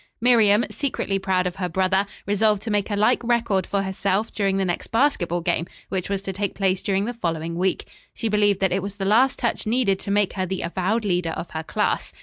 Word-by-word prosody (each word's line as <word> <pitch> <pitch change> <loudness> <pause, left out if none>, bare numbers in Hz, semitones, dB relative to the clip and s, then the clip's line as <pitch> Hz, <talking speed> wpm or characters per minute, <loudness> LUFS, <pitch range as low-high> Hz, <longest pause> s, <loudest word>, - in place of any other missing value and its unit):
Miriam, 225 -2 +5
secretly 200 -8 -2
proud 190 -1 0
of 180 -1 -3
her 180 -2 -2
brother, 190 +3 +1 0.2
resolved 210 0 +2
to 225 - -3
make 205 0 0
a 205 - -1
like 215 +5 +2
record 230 -6 +1
for 200 -1 0
herself 195 +2 -1
during 195 -2 0
the 195 - +1
next 175 -1 -2
basketball 215 - +1
game, 170 -1 -1 0.2
which 190 -1 -3
was 195 -1 -2
to 195 - -4
take 200 +1 -3
place 190 -1 +1
during 195 -1 0
the 240 - -3
following 170 -7 -3
week. 185 +2 -1 0.3
She 225 - -2
believed 205 -2 +2
that 190 - +2
it 190 - 0
was 200 +1 -6
the 195 -1 -4
last 240 +7 +4
touch 235 -2 -2
needed 220 -5 +2
to - - -7
make 205 -1 +2
her 185 -1 -2
the 190 +1 -3
avowed 195 +6 -1
leader 180 -3 0
of - - -6
her 160 - -3
class. 160 - -1
195 Hz, 225 wpm, -23 LUFS, 185-215 Hz, 0.3 s, Miriam